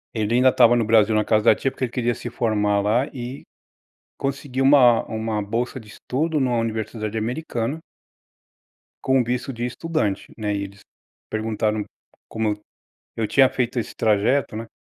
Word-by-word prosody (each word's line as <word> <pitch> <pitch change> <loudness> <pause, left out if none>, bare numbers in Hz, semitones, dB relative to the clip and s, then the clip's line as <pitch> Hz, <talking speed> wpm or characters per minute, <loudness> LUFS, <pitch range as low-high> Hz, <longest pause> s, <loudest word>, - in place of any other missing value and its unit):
Ele 110 +1 0
ainda 130 +1 +5
estava 120 -2 +5
no 115 -2 +1
Brasil 110 -1 +4
na 105 -1 +2
casa 110 0 +2
da 110 - +7
tia 135 - -1
porque 130 - -2
ele 120 - -8
queria 120 -1 0
se 120 - -7
formar 105 -4 +1
lá 115 +7 +1
e, 125 +1 -7 0.7
conseguir 135 -1 -3
uma 130 -4 +6
uma 110 -1 -2
bolsa 120 +5 -3
de 110 - -15
estudo 150 +8 -2
numa 125 -3 +1
universidade 110 -1 -3
americana 120 +3 -3 1.2
com 130 0 +3
o - - +3
visto 125 +2 -2
de 120 -1 -4
estudante, 125 - -2
né, 105 -1 -2
e 100 - -2
eles 100 0 -10 0.5
perguntaram 110 -1 -1 0.5
como 110 -1 -1
eu 105 - -5 0.6
eu 110 -1 0
tinha 135 +2 +5
feito 125 -1 -1
esse 115 - -6
trajeto, 110 +4 +1
né, 115 +1 -5
115 Hz, 170 wpm, -22 LUFS, 110-130 Hz, 1.2 s, da